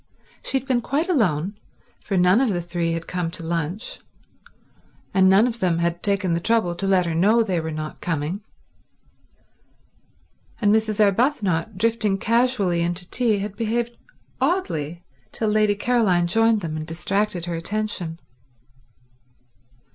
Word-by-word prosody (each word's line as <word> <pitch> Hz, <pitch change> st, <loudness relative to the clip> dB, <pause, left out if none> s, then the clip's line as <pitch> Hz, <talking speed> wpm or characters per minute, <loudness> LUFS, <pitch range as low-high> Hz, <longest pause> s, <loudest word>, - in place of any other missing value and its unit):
She 270 Hz, -, 0 dB
had 265 Hz, +1 st, -6 dB
been 250 Hz, -3 st, +1 dB
quite 290 Hz, +8 st, -1 dB
alone, 200 Hz, -, +1 dB, 0.4 s
for 195 Hz, -, -1 dB
none 180 Hz, +6 st, +4 dB
of 265 Hz, -, +2 dB
the 180 Hz, -4 st, 0 dB
three 170 Hz, -1 st, -2 dB
had 165 Hz, 0 st, -4 dB
come 180 Hz, -2 st, -2 dB
to 165 Hz, 0 st, -7 dB
lunch, 170 Hz, +6 st, -3 dB, 1.1 s
and 190 Hz, -1 st, +5 dB
none 195 Hz, +4 st, +6 dB
of 235 Hz, -2 st, -3 dB
them 180 Hz, -4 st, +1 dB
had 170 Hz, 0 st, -1 dB
taken 200 Hz, -3 st, +1 dB
the 165 Hz, -, +1 dB
trouble 220 Hz, -2 st, +1 dB
to 195 Hz, +3 st, -3 dB
let 185 Hz, -2 st, +3 dB
her 170 Hz, -, -2 dB
know 210 Hz, +8 st, +4 dB
they 185 Hz, -5 st, -1 dB
were 160 Hz, 0 st, -4 dB
not 155 Hz, 0 st, -6 dB
coming; 165 Hz, +4 st, -2 dB, 2.2 s
and 210 Hz, -2 st, +3 dB
Mrs. 220 Hz, -1 st, +1 dB
Arbuthnot, 205 Hz, -, +1 dB
drifting 215 Hz, -2 st, +1 dB
casually 225 Hz, -6 st, +1 dB
into 175 Hz, +1 st, -2 dB
tea, 235 Hz, -4 st, +2 dB
had 200 Hz, 0 st, -4 dB
behaved 235 Hz, +2 st, -1 dB, 0.5 s
oddly 175 Hz, -, -1 dB, 0.3 s
till 220 Hz, -, -1 dB
Lady 210 Hz, -1 st, +3 dB
Caroline 205 Hz, -6 st, +2 dB
joined 225 Hz, +4 st, +3 dB
them 160 Hz, -3 st, -4 dB
and 155 Hz, 0 st, -5 dB
distracted 180 Hz, +2 st, -1 dB
her 175 Hz, -, -4 dB
attention. 175 Hz, -2 st, -3 dB
195 Hz, 145 wpm, -23 LUFS, 170-225 Hz, 2.2 s, none